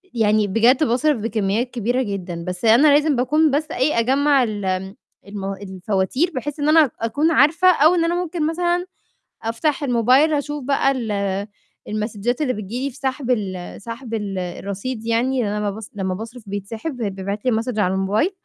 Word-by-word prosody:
يعني 215 -2 +3
بجد 235 +8 +3
باصرف 285 +2 +2
بكميات 220 +2 -1
كبيرة 245 +2 0
جدًا، 180 -5 -5
بس 180 +4 -4
أنا 240 +7 +6
لازم 295 -1 +3
باكون 300 +5 +2
بس 305 +3 -1
إيه، 260 -3 +1
أجمع 275 +2 +3
ال 205 -3 -3 0.6
المو 195 -1 -4
الفواتير 195 - -1
بحيث 290 +3 -4
إن 290 - +1
أنا 310 -4 +5
أكون 285 +9 +1
عارفة 330 +5 +5
أو 320 +2 +4
إن 335 -1 +2
أنا 340 +1 0
ممكن 345 -3 -1
مثلًا 350 +2 0 0.6
أفتح 270 +7 -1
الموبايل 255 +4 +3
أشوف 295 -1 -2
بقى 275 0 +2
ال 240 -5 -3 0.8
المسدچات 215 +4 -2
اللي 265 -4 +1
بتيجي 215 +4 -5
لي - - -1
في 255 - -16
سحب 265 -1 -2
ال 190 -5 -3
سحب 230 +1 -8
ال 205 -3 -3
الرصيد 200 +6 -5
يعني، 245 +3 +1
لإن 205 - -1
أنا 210 - -2
لمّا 210 - -1
باص 215 0 -9
لمّا 190 -2 -2
باصرف 225 +3 -8
بيتسحب 220 +9 -5
وبيتبعِت 200 0 -4
لي 255 - +3
الMessage 225 0 -1
على 190 -2 +2
الموبايل. 205 - +1
235 Hz, 175 wpm, -21 LUFS, 205-285 Hz, 0.8 s, أنا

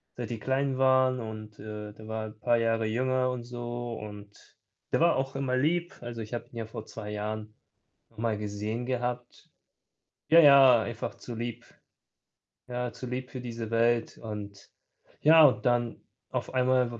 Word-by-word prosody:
seit 120 -3 -5
die 115 -2 -4
klein 135 +2 0
waren 130 -1 +4
und, 110 -2 -7
äh, 105 0 -7
der 110 +1 -12
war 110 0 -3
halt 110 0 -8
'n 110 - -32
paar 120 +1 +3
Jahre 115 -1 +1
jünger 130 +3 +1
und 125 -1 -5
so, 120 0 -5
und 105 -1 -11 0.3
der - - +2
war 170 - +5
auch 135 +1 -2
immer 135 -2 0
lieb. 170 +6 0
Also, 120 -1 -6
ich 110 +2 -8
habe 120 0 -4
ihn 120 - -11
ja 115 - -3
vor 110 -1 -8
2 110 -2 -8
Jahren 105 +1 -4 0.6
noch - - -27
mal 115 -1 0
gesehen 105 +3 -3
gehabt. 125 -1 -4 0.8
Ja, 165 - +8
ja, 135 -6 +8
einfach 115 +2 -5
zu 120 - -8
lieb 120 +1 -5 1.0
ja, 125 -1 -3
zu - - -8
lieb 125 +1 -4
für 130 - -6
diese 115 -2 -5
Welt, 115 0 +2
und 105 -2 -8 0.5
ja, 160 +1 +8
und 135 -2 +3
dann 120 -1 +1 0.3
auf - - -4
einmal 130 -1 +3
w 115 - -7
120 Hz, 180 wpm, -29 LUFS, 110-130 Hz, 1.0 s, Ja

